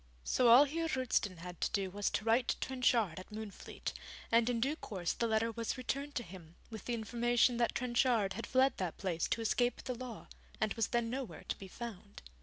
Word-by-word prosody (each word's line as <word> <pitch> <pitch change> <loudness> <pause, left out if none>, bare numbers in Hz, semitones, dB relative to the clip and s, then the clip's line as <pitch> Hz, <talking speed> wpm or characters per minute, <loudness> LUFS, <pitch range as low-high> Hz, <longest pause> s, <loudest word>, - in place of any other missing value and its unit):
So 250 - +3
all 240 +4 +10
Heer 325 +3 -1
Roosten 255 - 0
had 175 +1 -9
to - - +2
do 195 -2 0
was 205 +1 0
to 210 - -2
write 230 +2 +3
to - - 0
Trenchard 235 -8 +1
at 185 - -11
Moonfleet, 215 -1 -6 0.4
and 230 +1 +4
in 240 -2 0
due 275 +6 +1
course 185 - -3
the 235 - 0
letter 225 +1 +1
was 230 +3 -3
returned 275 +3 -3
to 240 - -1
him, 170 -4 -12 0.2
with 220 -3 -8
the 240 - -1
information 240 +2 +2
that 235 -1 +1
Trenchard 240 -5 +2
had 230 - -5
fled 260 +1 +4
that 180 -4 -3
place 175 -4 -1
to 230 - -1
escape 245 +2 +1
the 255 - -2
law, 245 -2 -7 0.3
and 215 -2 +1
was 225 -2 0
then 235 -1 0
nowhere 260 -2 -5
to - - 0
be 195 - -10
found. 205 -1 -8
230 Hz, 215 wpm, -34 LUFS, 205-250 Hz, 0.4 s, all